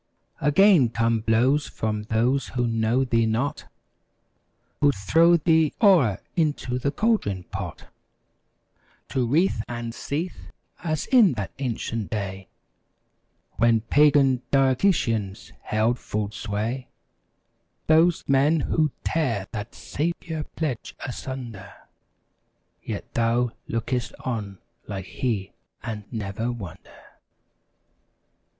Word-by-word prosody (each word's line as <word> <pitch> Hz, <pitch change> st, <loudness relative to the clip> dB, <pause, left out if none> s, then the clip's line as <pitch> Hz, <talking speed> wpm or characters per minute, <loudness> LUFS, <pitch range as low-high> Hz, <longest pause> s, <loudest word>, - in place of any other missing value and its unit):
Again 150 Hz, -, +5 dB
come 115 Hz, 0 st, +1 dB
blows 120 Hz, +7 st, +2 dB
from 105 Hz, -1 st, -3 dB
those 120 Hz, +5 st, +1 dB
who 120 Hz, -, +2 dB
know 115 Hz, +2 st, +1 dB
thee 115 Hz, -3 st, +2 dB
not; 120 Hz, +6 st, -1 dB, 1.1 s
Who'd 145 Hz, -2 st, +3 dB
throw 165 Hz, -, +4 dB
thee 160 Hz, -1 st, +2 dB
o'er 165 Hz, -, +5 dB, 0.2 s
into 145 Hz, -7 st, 0 dB
the 140 Hz, -, 0 dB
cauldron 150 Hz, -, 0 dB
pot— -, -, -7 dB, 1.2 s
To 125 Hz, -3 st, 0 dB
writhe 145 Hz, -, +2 dB
and 120 Hz, -1 st, -5 dB
seethe, 160 Hz, +9 st, -5 dB, 0.3 s
as 155 Hz, -3 st, -1 dB
in 230 Hz, -, +5 dB
that 100 Hz, -7 st, -4 dB
ancient 115 Hz, -4 st, -3 dB
day 95 Hz, -3 st, -4 dB, 1.1 s
When 115 Hz, 0 st, +4 dB
Pagan 140 Hz, 0 st, +4 dB
Diocletians 125 Hz, -, +1 dB
held 110 Hz, +3 st, 0 dB
full 105 Hz, -1 st, -3 dB
sway. 110 Hz, +5 st, -3 dB, 1.0 s
^ -, -, -46 dB
Those 165 Hz, +2 st, +4 dB
men 145 Hz, +4 st, +3 dB
who'd 155 Hz, 0 st, +1 dB
tear 120 Hz, -12 st, 0 dB
that 105 Hz, +1 st, -6 dB
Saviour 160 Hz, 0 st, -3 dB
pledge 145 Hz, -8 st, -3 dB
asun¬ 130 Hz, -1 st, -5 dB
der 95 Hz, -2 st, -12 dB, 1.1 s
Yet -, -, -6 dB
thou 120 Hz, +1 st, +1 dB, 0.2 s
look'st 120 Hz, +2 st, -2 dB
on 105 Hz, -6 st, -4 dB, 0.3 s
like 95 Hz, -2 st, -5 dB
He 105 Hz, -4 st, -2 dB, 0.3 s
and 105 Hz, -3 st, -5 dB
never 110 Hz, +1 st, -3 dB
wonder. 100 Hz, -9 st, -10 dB
120 Hz, 105 wpm, -25 LUFS, 110-145 Hz, 1.2 s, Again